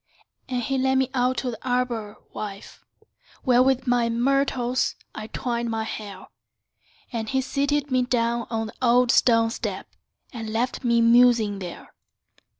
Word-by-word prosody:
And 250 -1 -1
he 270 +2 -1
led 265 0 +2
me 265 0 +1
out 255 0 +1
to 250 - -2
the 230 - -10
arbor, 245 -4 -2 0.2
wife, 200 -1 -8 0.6
Where 250 -2 +4
with 260 0 +2
myrtles 245 +1 +1 0.2
I 215 0 -7
twined 235 0 -3
your 225 -1 -2
hair; 205 -3 -7 0.9
And 220 -2 -3
he 265 - +1
seated 280 +1 -1
me 255 0 +3
down 235 -1 0
on 225 -1 -2
the 215 - -9
old 245 0 +4
stone 230 -3 +4
step, - - -4 0.5
And 225 -2 -6
left 235 +5 -2
me 235 -1 +3
musing 230 -3 +4
there. 180 -3 -9
240 Hz, 150 wpm, -24 LUFS, 225-255 Hz, 0.9 s, Where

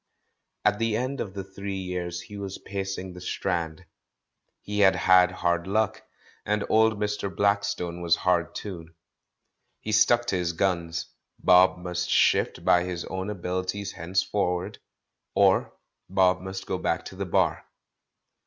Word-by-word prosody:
At 105 0 +3
the 115 -1 +1
end 130 +3 -2
of 95 -2 -6
the 95 - -4
three 95 +1 -6
years 90 -2 -4
he 105 - -11
was 100 -1 -5
pacing 95 -2 -5
the 90 - -10
Strand. 85 -3 -3 0.8
He 105 0 -3
had 95 -2 +6
had 90 0 +5
hard 85 -1 -1
luck, 110 +1 0 0.4
and 105 0 0
old 110 -1 +3
Mr. 105 -1 -1
Blackstone 100 -2 0
was 85 -1 +3
hard 90 -2 0
too. 90 -6 -6 0.9
He 110 - -5
stuck 120 +2 +4
to - - +2
his 85 -1 -1
gims; 85 -2 -1 0.3
Bob 90 +1 +5
must 90 0 -3
shift - - +2
by 90 0 +5
his 90 -2 -4
own 95 +2 -4
abilities 95 +1 -3
henceforward, 90 +1 -1 0.6
or - - +4 0.4
Bob 95 -1 +3
must 95 0 -6
go - - -2
back - - -1
to - - -9
the - - -4
Bar. - - +1
95 Hz, 145 wpm, -26 LUFS, 90-100 Hz, 0.9 s, had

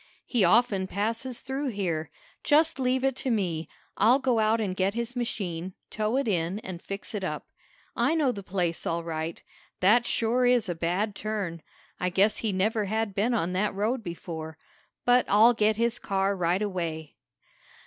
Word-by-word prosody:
"He 240 -6 +1
often 200 0 +3
passes 225 +6 -2
through 270 +2 -3
here. 180 -9 -2 0.3
Just 310 0 +3
leave 255 0 +1
it 270 -1 +2
to 265 - -2
me. 175 -8 -1 0.3
I'll 230 +6 +5
go 255 -4 +1
out 220 +1 +3
and 195 -4 -1
get 195 +2 0
his 235 +1 -3
machine, 185 -7 -3 0.2
tow 215 +3 0
it 275 - 0
in 175 -1 0
and 180 -4 -7
fix 200 +3 -6
it 205 -2 -3
up. 155 -5 -3 0.5
I 320 - +2
know 295 -5 +2
the 200 - -6
place 180 -3 -2
all 170 0 -1
right. 160 0 -4 0.4
That 225 +6 +4
sure 245 +2 +2
is 245 -4 +3
a 175 - -1
bad 180 +6 -1
turn. 200 -6 -4 0.4
I 180 - 0
guess 195 +4 +3
he 220 - -1
never 210 +3 +1
had 220 0 -1
been 225 +5 +1
on 180 -5 0
that 195 +2 0
road 225 +5 0
before. 160 -3 -6 0.5
But 245 0 +4
I'll 220 +4 +6
get 215 -1 +2
his 235 +1 0
car 195 0 0
right 180 +2 +1
away." 165 -6 -4
205 Hz, 180 wpm, -27 LUFS, 180-235 Hz, 0.5 s, I'll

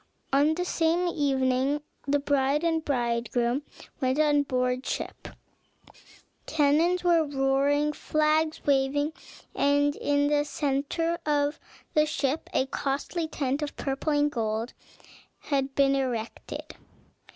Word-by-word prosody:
On 290 +3 +4
the 360 +1 -2
same 340 +1 +1
evening 270 -2 +1 0.3
the 285 +1 +3
bride 280 +1 +1
and 325 -1 +1
bridegroom 240 -1 0 0.4
went 260 +1 +1
on 295 -1 +4
board 255 -2 -1
ship; - - -5 1.2
cannons 320 +4 +2
were 340 -2 +4
roaring, 285 +1 +1
flags 310 +1 0
waving, 285 +2 +1 0.4
and 285 +1 +2
in 285 0 +1
the 295 0 +2
centre 295 +4 -1
of 290 0 0 0.3
the 305 0 +3
ship 285 0 -2
a 260 - +1
costly 285 +5 -2
tent 280 -2 -2
of 295 - -4
purple 275 +3 -2
and 295 0 +2
gold 225 -2 -2 0.7
had 270 -2 -2
been 275 -1 +4
erected. 245 -4 -4
285 Hz, 120 wpm, -27 LUFS, 270-305 Hz, 1.2 s, On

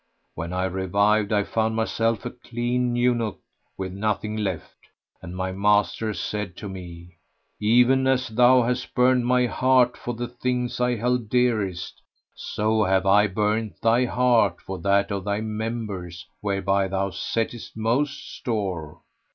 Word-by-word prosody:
When 80 +2 -5
I 90 0 -1
revived 100 +3 +1
I 105 -1 +2
found 110 +2 -1
myself 115 0 0
a 120 - -3
clean 120 0 -2
eunuch 120 -3 +1 0.4
with 95 -1 -4
nothing 105 +1 -2
left, 95 -7 -4 0.4
and 85 - -8
my 95 0 -2
master 105 +2 +1
said 100 +1 -4
to 105 - -6
me, 90 -2 -10 0.4
"Even 125 +5 +4
as 130 -2 +1
thou 125 +2 +5
hast 125 +1 -2
burned 125 -1 +3
my 125 0 +3
heart 125 0 +3
for 120 - -5
the 120 +1 -4
things 125 0 -2
I 125 0 +2
held 120 0 -1
dearest, 105 -7 0 0.3
so 110 +1 0
have 95 0 +2
I 105 +2 +5
burnt 105 0 -1
thy 115 +2 +3
heart 120 -7 +2
for 95 -1 -7
that 100 0 +2
of 100 -2 -2
thy 100 0 -1
members 110 -5 -5
whereby 100 -1 0
thou 95 +1 -1
settest 115 +2 -3
most 130 +6 -1
store!" 90 -8 -4
110 Hz, 145 wpm, -24 LUFS, 95-120 Hz, 0.4 s, thou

